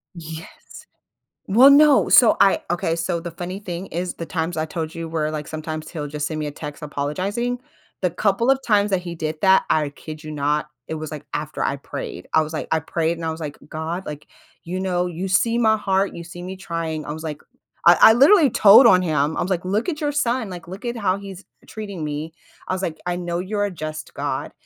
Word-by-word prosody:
Yes. 160 -1 -8 1.0
Well, 240 +8 +7
no, 290 0 +6
so 240 - +7
I 195 - +5
Okay, 165 -1 0
so 170 0 -1
the 170 0 -6
funny 180 +3 -6
thing 180 -2 -6
is 175 +2 -4
the 165 - -6
times 165 0 -3
I 155 - 0
told 160 0 -5
you 165 0 -5
where 155 -1 -1
like, 150 -1 -5
sometimes 155 0 -5
he'll 150 -4 -5
just 150 +1 -3
send 155 -1 -4
me 150 - -2
a - - -4
text 150 +1 -8
apologizing? 185 +12 -2 0.4
The 180 - +2
couple 200 +7 +1
of 270 - +2
times 210 -3 +2
that 190 -2 +1
he 175 -1 -6
did 155 -1 -3
that, 190 0 +5
I 150 -2 +2
kid 155 +2 -10
you 155 - -7
not, 150 0 0 0.2
it - - -4
was, 155 -1 -6
like, 150 -2 -7
after - - -4
I - - 0
prayed. 90 - -7
I 160 - +5
was 155 +1 -5
like, 155 - -4
I 160 - +3
prayed 165 +1 -1
and 165 - -5
I 160 - -1
was 160 +1 -7
like, 150 -2 -5
"God, 160 +4 -4
like, 150 0 -8 0.4
you 180 +2 -4
know, 180 -2 0
you 175 +2 -4
see 230 +5 +2
my 220 -2 +4
heart, 195 -1 0
you 170 - -7
see 175 +1 -10
me 185 +1 -6
trying" 165 -4 -4
I - - -5
was 160 +1 -8
like 150 -2 -5 0.4
I 175 +1 +8
I 220 - +10
literally 290 - +6
told 215 +3 +8
on 185 -4 +6
him, 155 -3 0
I - - 0
was, 180 - -2
like, 180 -2 -1
"Look 205 - 0
at 310 -3 -4
your 295 -1 0
son, 250 -6 0
like, 175 -2 -9
look 190 +6 -9
at 240 0 -3
how 195 -3 +1
he's 195 -1 -10 0.2
treating 200 -6 -6
me." 150 +2 -4 0.3
I - - -1
was, 185 - -2
like, 160 -4 -3
"I 175 0 -1
know 175 -1 -3
you're 205 +3 -2
a 200 - -3
just 155 -2 -7
God," - - -3
175 Hz, 235 wpm, -22 LUFS, 155-195 Hz, 1.0 s, I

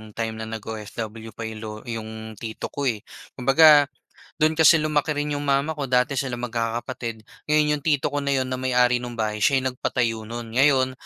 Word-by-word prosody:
time 110 -1 -3
na 110 - -5
nag-OFW 110 0 -7
pa 115 - -6
yung 110 -1 -6
lo 110 -1 -6
yung 110 -2 -7
tito 110 -1 -6
ko 140 -1 -2
eh. 110 -4 -1 0.3
Kumbaga, 145 +3 +7 0.5
do'n 155 +1 +3
kasi 160 +1 +8
lumaki 150 0 0
rin 145 0 -2
yung 145 0 -3
mama 140 +3 +2
ko, 140 - -2
dati 125 +1 +2
silang 125 -2 -3
magkakapatid. 115 -1 -3 0.2
Ngayon, 150 -1 +2
yung - - -23
tito 145 -2 +1
ko 145 - -1
na 140 -1 0
'yon 130 -1 -1
na 130 - -2
may-ari 125 -1 +3
nung 120 -1 -7
bahay, 110 -2 -2
siya 130 +5 +3
yung 130 - 0
nagpatayo 115 -3 -2
no'n. 115 +1 -4
Ngayon, 135 -2 +4
125 Hz, 195 wpm, -24 LUFS, 115-140 Hz, 0.5 s, kasi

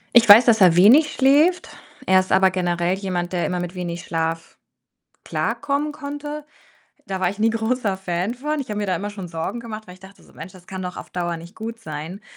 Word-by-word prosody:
Ich 230 -3 +6
weiß, 220 +4 +10
dass 225 -3 +4
er 180 -3 +6
wenig 245 - +6
schläft. 295 +7 +3 0.4
Er 190 0 +5
ist 185 - -3
aber 190 0 +4
generell 175 -1 0
jemand, 180 -2 -3
der 175 -1 0
immer 180 -1 -2
mit 175 0 -5
wenig 175 -2 -5
Schlaf 165 0 -3 0.7
klarkommen 290 +1 -2
konnte. 295 +1 -7 0.6
Da 190 -1 -4
war 185 - +2
ich 200 +3 -6
nie 225 +1 +3
großer 225 -2 -1
Fan 185 +2 -2
von. 300 +4 -3
Ich 270 - -7
habe 210 - -3
mir 205 - -2
da 185 -2 0
immer 205 +4 -5
schon 195 -4 -8
Sorgen 165 +8 -4
gemacht, 220 -2 -8
weil 180 - -11
ich 185 - -20
dachte 195 +1 -16
so. - - -21
„Mensch, 165 +4 -10
das 180 -1 -16
kann 190 -1 -7
doch 180 0 -6
auf - - -9
Dauer 175 -1 -3
nicht 170 +4 -12
gut 225 +1 -7
sein.“ 165 0 -8
190 Hz, 225 wpm, -21 LUFS, 175-235 Hz, 0.7 s, weiß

